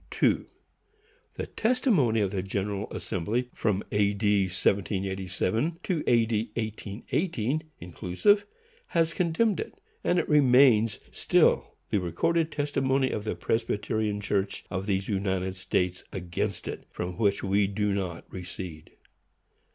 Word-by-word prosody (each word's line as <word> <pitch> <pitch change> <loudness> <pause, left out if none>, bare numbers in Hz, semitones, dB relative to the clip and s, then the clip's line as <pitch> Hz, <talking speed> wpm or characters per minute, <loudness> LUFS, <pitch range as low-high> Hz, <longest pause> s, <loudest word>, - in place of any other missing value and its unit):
2. - - +1 0.9
The - - -3
testimony 215 - +2
of 100 -2 0
the 95 -2 -1
General 100 +1 -2
Assembly, 115 +8 -2
from 105 -2 0
A. 105 0 +2
D. 100 -1 +3
1787 95 - 0
to 170 -5 -1
A. 115 -2 +5
D. 110 0 -1
1818, 115 - -2 0.2
inclusive, 90 - +1 0.4
has 165 -1 +1
condemned 185 +5 +1
it; - - -5 0.3
and 175 - +2
it 170 - +1
remains 125 -6 +5
still - - +2 0.2
the 105 - +3
recorded 155 - 0
testimony 135 -3 +1
of 105 - -3
the - - -1
Presbyterian 110 -1 -1
Church 100 -1 -1
of 95 +1 -3
these 95 -1 0
United 95 -2 -1
States 90 -1 -1
against 95 +1 -3
it, - - -6
from 90 0 -5
which 100 -3 +2
we 100 +1 +2
do 100 0 0
not 90 -4 -3
recede. 90 -3 -7
105 Hz, 130 wpm, -28 LUFS, 95-130 Hz, 0.9 s, A